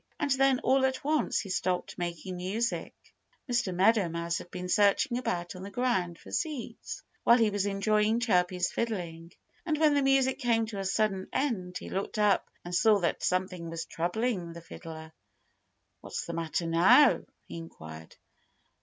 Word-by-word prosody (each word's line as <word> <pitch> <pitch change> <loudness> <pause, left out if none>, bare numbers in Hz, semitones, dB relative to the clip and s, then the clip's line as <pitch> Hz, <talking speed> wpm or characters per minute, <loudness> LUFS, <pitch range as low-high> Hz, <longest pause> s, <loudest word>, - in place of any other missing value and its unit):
And 290 -1 0
then 270 0 +4
all 265 0 +3
at 265 +2 0
once 305 +1 +1
he 200 - -9
stopped 185 -1 -1
making 175 +1 -4
music. 210 +7 -2 0.5
Mr. 235 -6 0
Meadow 195 +1 +3
Mouse 170 +1 -2
had - - -11
been 180 0 -6
searching 210 +7 +3
about 180 -9 -3
on 180 - -8
the 195 - -7
ground 195 -7 0
for - - -14
seeds, 265 -8 -4 0.2
while 235 - +6
he 225 -3 +3
was 205 0 0
enjoying 210 +3 +2
Chirpy's 180 -6 +1
fiddling. 170 -7 -4 0.3
And 315 -3 0
when 305 -1 +4
the 285 - +3
music 270 -1 +3
came 230 -3 +2
to 215 -2 -6
a 195 - -3
sudden 195 -1 0
end 185 -10 -1
he - - -9
looked 195 +3 -3
up 210 -2 +2 0.2
and 175 - -6
saw 210 +5 +5
that 170 - 0
something 180 -2 -1
was 165 0 -4
troubling 175 0 -2
the 170 - -9
fiddler. 160 -1 -10 0.9
"What's - - -5
the 170 - -5
matter 165 0 -2
now?" 175 - +5 0.2
he - - -7
inquired. 80 - -10
195 Hz, 170 wpm, -29 LUFS, 175-235 Hz, 0.9 s, while